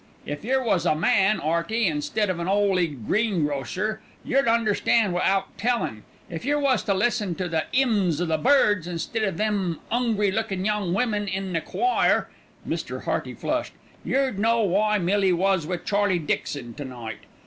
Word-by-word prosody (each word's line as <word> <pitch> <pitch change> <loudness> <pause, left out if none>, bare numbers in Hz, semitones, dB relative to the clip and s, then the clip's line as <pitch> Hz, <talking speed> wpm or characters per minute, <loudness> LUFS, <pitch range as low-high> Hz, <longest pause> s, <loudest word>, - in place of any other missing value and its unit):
If 145 +4 -5
yer 260 +3 +1
was 185 -7 +1
a 155 - +3
man, 190 +5 +3
'Earty, 170 +9 0
instead 185 +6 0
of 175 - -4
an 170 - -3
'oly 195 -3 +2
greengrocer, 175 - -1 0.2
yer'd 275 -1 +2
understan' 225 -2 +2
wi'out 195 +2 0
tellin'. 230 - -1 0.3
If 165 -2 -6
yer 290 +3 +1
was 275 -3 +2
to 200 - +1
listen 205 -3 0
to 185 +1 -3
the 160 -2 -1
'ymns 210 - +2
o' 175 - 0
the 160 -2 0
birds 205 - +3
instead 180 +6 -3
o' 205 - +2
them 195 -3 -1
'ungry 225 -4 +1
lookin' 195 -3 -2
young 205 -4 0
women 210 -2 0
in 190 -1 -3
the 165 - 0
choir" 370 - +1 0.4
(Mr. - - -4
Hearty - - -2
flushed) - - -2 0.3
"yer'd 265 -7 0
know 230 +2 +3
why 210 +2 +2
Millie 190 0 +2
was 185 -2 +1
wi' 180 0 -1
Charlie 200 +1 +1
Dixon 140 -5 -3
to 145 - -7
night. 120 -5 -7
195 Hz, 170 wpm, -24 LUFS, 170-220 Hz, 0.4 s, a